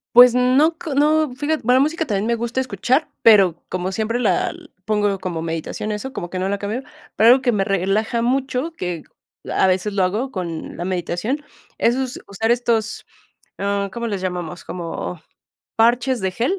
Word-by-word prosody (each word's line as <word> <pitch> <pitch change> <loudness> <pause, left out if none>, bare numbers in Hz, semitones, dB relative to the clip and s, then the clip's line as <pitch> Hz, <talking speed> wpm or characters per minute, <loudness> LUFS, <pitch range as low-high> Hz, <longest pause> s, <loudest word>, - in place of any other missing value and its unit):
Pues 245 0 +9
no, 260 +6 +3
cr 315 -3 -5
no, 305 0 +3
fíjate, 295 +4 -1
va 250 - +4
la 255 - +5
música 315 +4 +1
también 205 -3 -1
me 235 - +2
gusta 235 +2 -2
escuchar, 255 - 0
pero, 195 -7 +5
como 185 +1 -2
siempre 225 +4 -1
la 195 -7 +1 0.3
pongo 205 -2 +1
como 180 -3 -4
meditación, 165 +5 -4
eso 215 +6 -4
como 175 - -5
que 185 - -5
no 190 +1 -1
la 200 - -1
cambio, 210 +6 -3 0.3
pero, 220 - +5
algo 255 +2 +6
que 255 -1 +2
me 205 -4 +1
relaja 195 +4 0
mucho, 260 +5 0
que 175 - -5 0.5
a - - +3
veces 190 +2 0
lo 195 - +2
hago 215 +9 -1
con 170 -7 -5
la 175 - -4
meditación, 185 - -2 0.4
es 235 +2 +3 0.3
usar 220 +3 -1
estos, 235 -2 0 0.5
¿ah, 200 0 -1
cómo 235 +2 -3
les 200 -4 -2
llamamos? 180 -2 -4
Como 170 0 -5 0.6
parches 240 +3 +3
de 190 -2 -1
gel, 250 - 0
220 Hz, 180 wpm, -21 LUFS, 185-250 Hz, 0.6 s, Pues